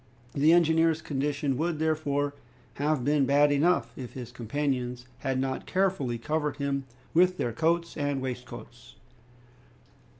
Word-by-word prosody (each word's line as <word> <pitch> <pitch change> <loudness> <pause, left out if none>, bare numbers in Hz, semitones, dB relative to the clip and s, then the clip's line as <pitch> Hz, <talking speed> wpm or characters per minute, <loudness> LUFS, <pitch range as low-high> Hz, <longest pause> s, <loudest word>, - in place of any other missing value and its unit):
The 150 +3 +4
engineer's 165 -1 +4
condition 145 -2 -1
would, 165 +1 -1
therefore, 145 -2 0 0.4
have 145 -3 0
been 145 -2 +3
bad 145 +1 +4
enough, 165 +6 +2
if 125 -2 -8
his 125 -2 -7
companions 125 0 -2
had 135 -1 -1
not 130 0 -2
carefully 185 -11 0
covered 150 +3 -2
him 140 -1 -2 0.3
with 180 +2 +4
their 120 -8 -1
coats 170 +5 0
and 145 -2 -1
waistcoats. 120 -2 -8
145 Hz, 130 wpm, -28 LUFS, 130-155 Hz, 0.4 s, The